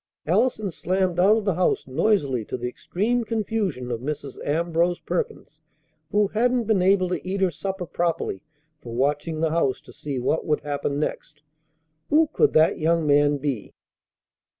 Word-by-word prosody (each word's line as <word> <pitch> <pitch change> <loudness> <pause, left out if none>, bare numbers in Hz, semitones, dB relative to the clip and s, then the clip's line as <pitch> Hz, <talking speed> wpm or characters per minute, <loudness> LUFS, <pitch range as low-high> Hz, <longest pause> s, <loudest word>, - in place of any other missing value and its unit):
Allison 210 +3 +1
slammed 185 +1 -1
out 200 +4 +5
of 220 - -3
the 195 - +2
house 180 +2 +1
noisily 135 - +1
to - - -4
the 125 0 -3
extreme 220 - -1
confusion 210 - -2
of 115 - -2
Mrs. 140 +1 -5
Ambrose 170 +3 +1
Perkins, 485 - -4 0.5
who 205 -1 +2
hadn't 245 +3 +1
been 215 -3 +2
able 185 0 +3
to 180 - -2
eat 190 +2 -3
her 190 -2 +3
supper 190 +3 -4
properly 165 - -2 0.4
for 115 -1 -8
watching 145 +5 0
the 160 -1 +1
house 150 -6 +1
to - - -15
see 145 -3 -5
what 130 +6 0
would 150 -1 0
happen 145 -1 -2
next. 150 0 -4 0.7
Who 310 +1 +4
could - - +3
that 155 +1 +4
young 165 0 +2
man 145 0 +4
be? 135 -6 -4
170 Hz, 165 wpm, -24 LUFS, 145-200 Hz, 0.7 s, out